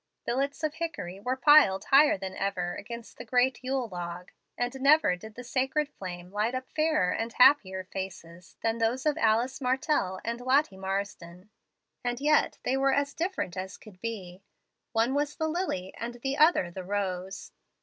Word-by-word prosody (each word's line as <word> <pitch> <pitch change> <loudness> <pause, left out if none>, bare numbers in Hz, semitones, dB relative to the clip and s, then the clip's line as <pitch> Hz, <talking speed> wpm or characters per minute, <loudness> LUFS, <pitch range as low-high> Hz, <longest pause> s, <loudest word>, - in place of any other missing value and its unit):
Billets 280 +5 -1
of 305 -1 0
hickory 315 - -5
were 250 +5 -1
piled 265 -8 +6
higher 285 -3 +5
than 190 0 -6
ever 185 -3 -2
against 235 +2 -9
the - - -5
great 250 +2 +1
yule 260 -1 -1
log; 175 -2 -7 0.3
and 245 +2 -3
never 285 - +5
did 215 +4 -12
the 250 - -8
sacred 265 +4 0
flame 180 -8 -8
light 215 +5 0
up 255 0 -4
fairer 310 - +2
and 230 +1 -3
happier 190 -9 +5
faces 180 -2 -8
than 225 0 0
those 235 +4 0
of 300 -1 +2
Alice 235 +5 +1
Martell 255 -7 0
and 235 +1 -3
Lottie 260 -4 +2
Marsden. 190 -1 -5 0.5
And 245 0 -2
yet 300 +2 +2
they 260 - +1
were 270 0 +2
as 285 0 0
different 340 - -3
as 190 0 -5
could 190 -4 -16
be. 195 -5 -6 0.5
One 230 +3 +2
was 290 +1 -1
the 315 - -1
lily, 315 - -2
and 240 +1 -5
the 270 +3 -3
other 300 - +4
the 185 +1 -7
rose. 190 -1 -3
235 Hz, 170 wpm, -28 LUFS, 190-275 Hz, 0.5 s, piled